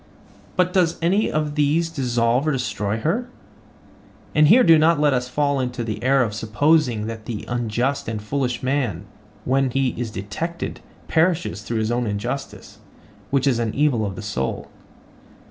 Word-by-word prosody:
But 180 0 +1
does 175 -3 +2
any 185 +6 +1
of 150 -1 -1
these 155 +3 +1
dissolve 125 -1 +1
or - - +3
destroy 110 -6 -2
her?—and 180 -6 -3
here 245 +9 +7
do 165 -2 +6
not 160 0 +4
let 145 -2 +3
us 125 -1 -1
fall 145 +1 0
into 125 -1 -2
the 110 -2 -4
error 135 +1 +3
of 105 -3 -3
supposing 115 +2 +1
that 110 -1 -6
the 110 -3 -5
unjust 120 +4 -1
and 110 -1 -3
foolish 125 +3 -2
man, 130 - -1 0.4
when 135 +1 +2
he 135 +1 +1
is 120 -1 -4
detected, 110 - -5 0.3
perishes 160 - +1
through 115 +2 -3
his 110 +1 0
own 120 0 0
injustice, 105 -1 -5 0.5
which 135 -1 +1
is 130 -4 +2
an 115 -2 -2
evil 140 -6 +2
of 100 -2 -3
the 110 - -7
soul. 80 -11 -3
130 Hz, 160 wpm, -22 LUFS, 110-150 Hz, 0.5 s, here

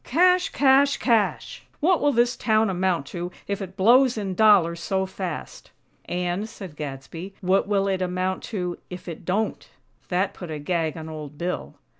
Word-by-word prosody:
CASH! 360 +5 +3
CASH! 275 0 +4
CASH!! 230 -4 0 0.2
What 345 +3 +3
will 290 - +3
this 240 0 +2
town 220 -2 +2
amount 180 -5 0
to 175 0 -4 0.2
if 200 0 -2
it 190 -1 -7
blows 245 +5 +5
in 195 -3 -2
dollars 185 -5 +4
so 190 +2 -1
fast?" 185 -3 -6 0.4
"And," 180 +4 -2
said 190 -7 -10
Gadsby, 150 +6 -7
"what 190 +1 +2
will 200 -1 +1
it 190 -1 0
amount 185 +1 -1
to, 180 -5 -4
if 180 0 -9
it 165 -1 -7
don't?" 210 +5 -1 0.4
That 190 +2 0
put 180 - -9
a 155 - -4
gag 160 +1 -1
on 160 0 -7
Old 150 -2 -8
Bill. 175 +3 -4
190 Hz, 170 wpm, -24 LUFS, 175-220 Hz, 0.4 s, blows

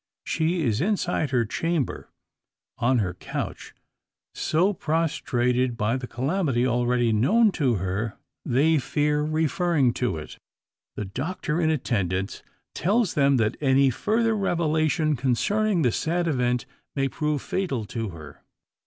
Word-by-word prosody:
She 165 +1 0
is 115 -3 +1
inside 180 -5 0
her 125 -3 +1
chamber 165 +4 -2 0.7
on 125 +2 +3
her 95 -6 0
couch 90 - -6 0.6
so 180 +6 +1
prostrated 130 -7 0
by 110 +3 +1
the 130 -1 -4
calamity 135 -1 0
already 120 -1 +1
known 210 - +4
to 125 -5 +3
her, 100 +4 -3 0.3
they 150 +5 +3
fear 150 +3 0
referring 155 -3 +1
to 120 -10 0
it. 75 0 -9 0.6
The 105 - -4
doctor 150 - -3
in 160 - +2
attendance 95 - -1 0.3
tells 205 +3 +1
them, 140 -2 +3
that 110 -1 +1
any 135 -1 +4
further 225 - +1
revelation 155 -5 +1
concerning 175 - +1
the 125 - +3
sad 170 +7 -1
event 125 -5 0 0.3
may 135 -1 +1
prove 150 +1 -2
fatal 140 - -2
to 115 +1 -4
her. 75 -5 -11
140 Hz, 130 wpm, -25 LUFS, 120-165 Hz, 0.7 s, known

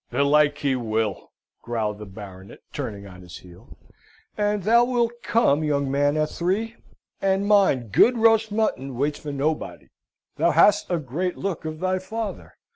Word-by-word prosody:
"Belike, 145 +3 +3
he 140 -3 0
will," 110 -4 -2 0.3
growled 110 -3 -3
the 105 - -9
Baronet, 95 -1 -11 0.2
turning 100 -2 -5
on 90 -2 -12
his 90 0 -11
heel. 90 -1 -16 0.6
"And 210 -1 -1
thou 235 +4 +5
wilt 240 -2 +1
come, 155 -10 +2
young 140 -3 0
man, 145 +2 +1
at 155 0 0
three; 210 +6 -2 0.5
and 195 +1 +1
mind, 190 - +3
good 240 - +4
roast 225 -1 +3
mutton 140 - -1
waits 145 +4 -1
for 150 - -6
nobody. 150 +3 -3 0.5
Thou - - +3
hast 205 0 +4
a 175 - +1
great 165 +6 -3
look 190 -5 -4
of 155 0 -5
thy 185 +1 0
father. 220 +3 -6
150 Hz, 160 wpm, -23 LUFS, 120-205 Hz, 0.6 s, thou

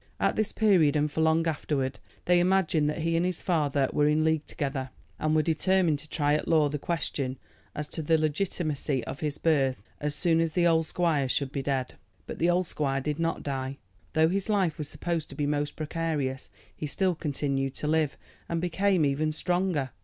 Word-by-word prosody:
At - - +2
this 215 0 0
period, 185 -10 +4
and 150 0 +1
for 160 - -1
long 160 +1 +3
afterward, 140 -4 -1 0.3
they 175 0 +4
imagined 175 -4 +2
that 155 +1 -3
he 165 0 +1
and 165 - +2
his 180 -1 -2
father 145 -6 +1
were 150 - +3
in 155 +1 +3
league 160 -1 +1
together, 135 -3 -3 0.3
and 155 0 +1
were 155 - +4
determined 165 0 +2
to 150 +1 -11
try 145 -1 +1
at 150 - 0
law 155 -3 +4
the 150 +1 -3
question 135 -5 -2 0.4
as 150 0 -4
to 160 - -5
the 160 +1 +3
legitimacy 155 -4 -1
of 135 - -6
his 150 -2 -2
birth 135 -9 +1 0.2
as 145 0 -2
soon 165 -2 +2
as 165 -1 -1
the 175 +1 +2
old 165 -1 +3
squire 155 -7 +1
should 135 0 0
be 140 - -2
dead. 135 -2 -1 0.3
But - - -7
the 170 - +3
old 180 +1 +2
squire 135 -4 -1
did 150 +3 -3
not 165 0 -1
die. 135 -1 -3 0.4
Though 160 0 +4
his 195 +3 -2
life 190 -6 +1
was 150 -1 -4
supposed 165 +1 -3
to - - -10
be 145 - -1
most 145 0 -1
precarious 155 -4 -2 0.3
he 150 - -4
still 185 +5 +1
continued 140 -3 -2
to 150 - -3
live, 155 -2 +1 0.3
and 170 - 0
became 180 0 +2
even 145 +3 +1
stronger. 175 -4 0
155 Hz, 205 wpm, -28 LUFS, 145-170 Hz, 0.4 s, period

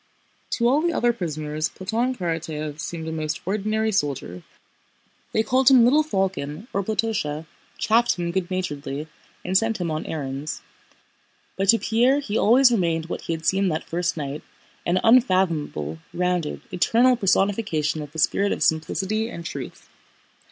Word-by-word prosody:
To 235 - +2
all 275 +5 +3
the 340 0 +1
other 240 -4 +2
prisoners 155 -5 -3
Platón 230 +7 -2
Karatáev 160 -4 -4
seemed 160 0 -5
a - - -3
most 155 -1 -3
ordinary 215 +3 0
soldier. 140 - -2 0.9
They 220 - +2
called 260 +3 +4
him 255 -3 +7
"little 275 +6 +5
falcon" 190 - -2
or 200 - 0
"Platósha," 200 -8 -1 0.3
chaffed 235 +2 +3
him 175 -1 -2
good 180 0 -2
naturedly, 150 -5 -4 0.4
and 185 - -2
sent 225 +2 +2
him 170 -2 -2
on 155 0 -3
errands. 140 -1 -4 0.9
But 195 0 -1
to 230 - +8
Pierre 240 +5 +2
he 225 -7 -4
always 245 +4 +5
remained 170 -6 0
what - - -4
he 165 - -3
had 160 0 -6
seemed 190 0 +2
that 155 - -2
first 175 0 -1
night: 145 0 -4 0.5
an 175 +2 +2
unfathomable, 170 - +2 0.2
rounded, 180 -3 -1
eternal 235 +7 +3
personification 195 -7 +1
of 150 -1 -8
the 160 - -11
spirit 200 +5 +2
of - - -1
simplicity 195 +7 0
and 170 -7 -8
truth. - - -7
185 Hz, 155 wpm, -24 LUFS, 155-225 Hz, 0.9 s, to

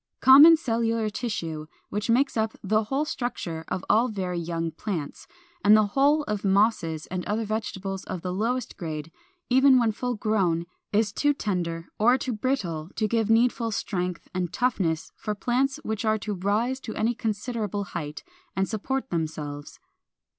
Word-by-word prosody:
= - - -60
Common 295 +5 +9
cellular 230 -5 0
tissue, 165 -10 -4 0.2
which 210 +3 -3
makes 265 +5 +3
up 220 -1 0
the 215 +2 +1
whole 275 +6 0
structure 175 - -4
of 185 - -3
all 230 +3 +4
very 185 -6 -3
young 165 -1 -2
plants, 165 -3 -5 0.4
and 210 +1 +7
the 215 - +4
whole 290 +3 +4
of 210 -6 -3
Mosses 195 -6 +2
and 185 -1 -2
other 220 +2 -1
vegetables 195 -3 -3
of 180 - -5
the 180 -1 -2
lowest 235 +5 -2
grade, 155 -3 -5 0.4
even 265 +1 +6
when 235 -3 +3
full 245 +3 -3
grown, 190 -6 +1 0.3
is 210 -1 +1
too 290 +4 +2
tender 170 -7 -2
or 240 +4 +5
too 255 -2 -3
brittle 195 - -2
to 215 - +1
give 225 0 0
needful 230 0 +3
strength 180 -4 -3
and 180 -2 -2
toughness 185 -10 0
for 210 - -4
plants 265 +6 0
which 220 0 -3
are 220 -1 +2
to 210 0 -4
rise 210 +7 0
to 225 -4 -7
any 230 +2 +1
considerable 215 -2 -2
height 155 -5 -6 0.3
and 190 0 +1
support 265 +5 -3
themselves. 155 -3 -4
210 Hz, 165 wpm, -26 LUFS, 180-240 Hz, 0.4 s, Common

